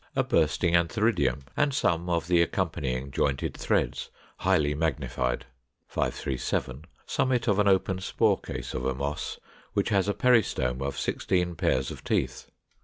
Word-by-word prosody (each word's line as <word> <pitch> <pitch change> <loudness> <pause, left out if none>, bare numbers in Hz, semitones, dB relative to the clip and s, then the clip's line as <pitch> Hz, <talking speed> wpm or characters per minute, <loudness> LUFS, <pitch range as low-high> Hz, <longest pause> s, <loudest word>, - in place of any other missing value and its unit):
A - - +3
bursting 80 +2 +2
antheridium, 85 - +2
and 145 -2 +1
some 85 -7 +1
of 85 -2 +1
the 85 -1 +4
accompanying 65 -5 -1
jointed 70 0 0
threads, - - 0 0.3
highly 75 -1 +2
magnified. 65 -5 -1 0.4
537. 65 +1 -2 0.2
Summit 125 -2 0
of 105 -2 +3
an 105 - +3
open 95 -1 +2
spore 95 - +2
case - - -6
of 65 - -3
a 65 0 0
Moss, 70 +3 -3 0.4
which 100 - +1
has 100 -2 +2
a 100 - 0
peristome 105 - +2
of 70 0 -3
16 90 -2 0
pairs 65 -5 0
of - - -9
teeth. - - -1
80 Hz, 145 wpm, -27 LUFS, 70-95 Hz, 0.4 s, the